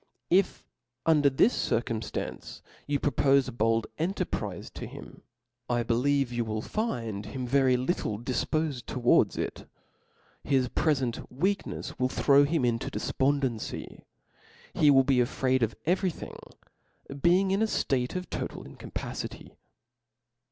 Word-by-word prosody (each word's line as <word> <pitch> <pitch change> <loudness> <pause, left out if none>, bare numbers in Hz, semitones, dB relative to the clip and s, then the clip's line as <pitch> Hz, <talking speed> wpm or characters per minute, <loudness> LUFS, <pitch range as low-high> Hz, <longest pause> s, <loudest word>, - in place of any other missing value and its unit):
If 185 +1 +2 0.4
under 150 -3 +5
this 140 - +3
circumftancc 115 -1 -3 0.2
you 145 -1 0
propofe 140 0 +3
a - - -4
bold 115 -1 +1
en 175 +5 0
terprize - - -4
to - - -6
him, - - -11 0.5
I 120 -1 +1
believe 125 +3 +1
you 120 0 0
will 110 -1 -3
find 115 - -3
him 125 +4 -4
very. 130 0 +3
little 125 - -1
difpofed 130 +2 -2
towards 125 -1 +3
it - - -2
:^ - - -13 0.8
his 130 -3 +3
prefent 135 -7 +1
weaknefs 190 +10 -2
will 125 0 +2
throw 140 +2 +4
hitn 150 -3 +1
into 115 -1 0
a - - -1
defpondency; 135 -4 -2 0.7
he 150 - +4
will 135 -1 +6
be 130 -1 +2
afraid 130 +1 +1
of 110 -1 0
every 185 +3 +2
thing, 165 - -8 0.9
being 185 +4 +4
in 195 +2 +1
a - - +4
ftate 130 - 0
of 180 0 -3
tqtal - - -4
incapacity. - - -7
135 Hz, 135 wpm, -28 LUFS, 120-155 Hz, 0.9 s, will